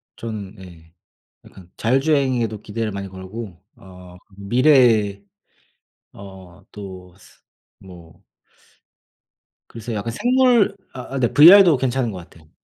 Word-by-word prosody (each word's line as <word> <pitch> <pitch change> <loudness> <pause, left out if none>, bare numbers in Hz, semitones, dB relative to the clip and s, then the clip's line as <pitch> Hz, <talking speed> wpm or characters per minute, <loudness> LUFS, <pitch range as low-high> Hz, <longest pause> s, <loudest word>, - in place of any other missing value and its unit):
저는 110 -3 -8
예. 85 -3 -16 0.5
약간 90 -2 -17
자율주행에도 130 -4 0
기대를 110 +1 -5
많이 100 0 -6
걸고 95 0 -10
어 90 -1 -15 0.2
미래에 110 -3 +2 0.9
어 95 -1 -14
또 95 -3 -11
스 90 - -23 0.4
뭐 85 -4 -16 1.5
그래서 115 0 -8
약간 110 +2 -4
생물 245 - +2 0.2
아아 135 +1 -7
네. 120 -2 0
VR도 175 0 +7
괜찮은 130 -2 -2
것 95 - -9
같아요. 80 -2 -22
105 Hz, 220 characters per minute, -20 LUFS, 95-130 Hz, 1.5 s, VR도